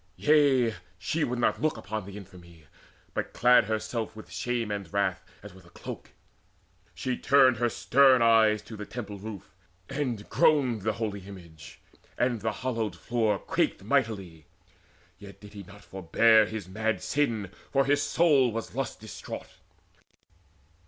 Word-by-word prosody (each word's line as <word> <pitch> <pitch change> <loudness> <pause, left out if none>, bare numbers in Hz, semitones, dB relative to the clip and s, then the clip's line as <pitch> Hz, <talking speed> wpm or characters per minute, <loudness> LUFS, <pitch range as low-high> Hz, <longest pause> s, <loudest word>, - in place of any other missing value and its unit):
Yea, 140 -6 +3 0.2
she 150 - -2
would 125 -2 -2
not 120 - 0
look 155 0 0
Upon 105 0 -5
the 100 0 -9
infamy, 85 -5 -14 0.5
but - - -4
clad 125 -2 +5
herself 110 +1 -3
With 110 - -12
shame 120 -3 -2
and 100 -5 -5
wrath 95 -2 0 0.2
as 105 -2 -11
with 95 0 -16
a 85 - -18
cloak: - - -9 0.9
she 130 -1 -2
turned 135 -3 +4
Her 120 +1 +1
stern 130 +2 +4
eyes 110 -2 +4
to 110 +1 -10
the 105 -1 -8
temple 105 -4 -7
roof, 105 -1 -9 0.4
and 125 -8 -3
groaned 130 -8 +2
The 110 +2 -1
holy 105 -2 -4
image, 85 -6 -12 0.4
and 120 -3 0
the 110 +1 -1
hallowed 115 -5 -3
floor 110 +1 0
Quaked - - -1
mightily. 95 -8 -1 0.7
Yet 100 0 -12
did 105 0 -14
he 100 - -8
not 100 +2 -14
forbear 105 +4 +3
His 110 -4 -6
mad 110 +4 -2
sin, 115 -9 -1 0.2
for 135 0 +2
his 145 +1 +2
soul 145 -4 +3
was 115 +1 -5
lust 130 -3 -4
distraught. 110 - -9
110 Hz, 150 wpm, -28 LUFS, 100-125 Hz, 0.9 s, clad